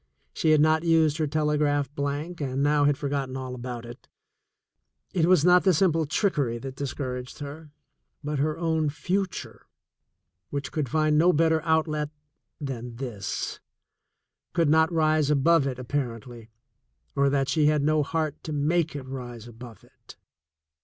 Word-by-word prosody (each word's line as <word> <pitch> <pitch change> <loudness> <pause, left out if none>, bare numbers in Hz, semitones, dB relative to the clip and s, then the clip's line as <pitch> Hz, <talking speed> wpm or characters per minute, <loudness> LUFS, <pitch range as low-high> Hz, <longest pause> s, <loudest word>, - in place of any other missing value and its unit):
She 160 - 0
had 155 -1 +5
not 155 +1 +3
used 160 -3 +3
her 155 - +1
telegraph 150 -1 0
blank, 145 +4 -3
and 135 0 -1
now 145 0 +3
had 145 -1 +3
forgotten 140 -2 -3
all 130 -1 -5
about 120 -1 -6
it. 120 +1 -12 1.1
It 170 -2 +2
was 180 -4 +4
not 180 0 +6
the 190 -3 +4
simple 165 -3 +2
trickery 145 - 0
that 130 +2 -7
discouraged 130 -2 -5
her, 150 +2 -8 0.5
but 150 -1 -2
her 155 +2 0
own 160 -2 0
future 185 +5 -3 0.8
which 140 -1 -4
could 150 -5 -2
find 155 +1 +2
no 175 +3 +5
better 160 0 +2
outlet 155 -2 0 0.5
than 125 -5 -5
this, 115 -7 -4 0.9
could 165 -3 +2
not 160 +1 +4
rise 155 -2 +2
above 150 +1 +3
it 130 -2 -3
apparently, 120 -3 -5 0.7
or 140 0 +3
that 135 -1 +1
she 150 -1 +2
had 150 -1 +2
no 155 +1 +3
heart 155 0 -2
to 155 - -4
make 155 +2 0
it 140 - -5
rise 120 -3 -7
above 120 -1 -12
it. - - -17
150 Hz, 155 wpm, -26 LUFS, 135-160 Hz, 1.1 s, not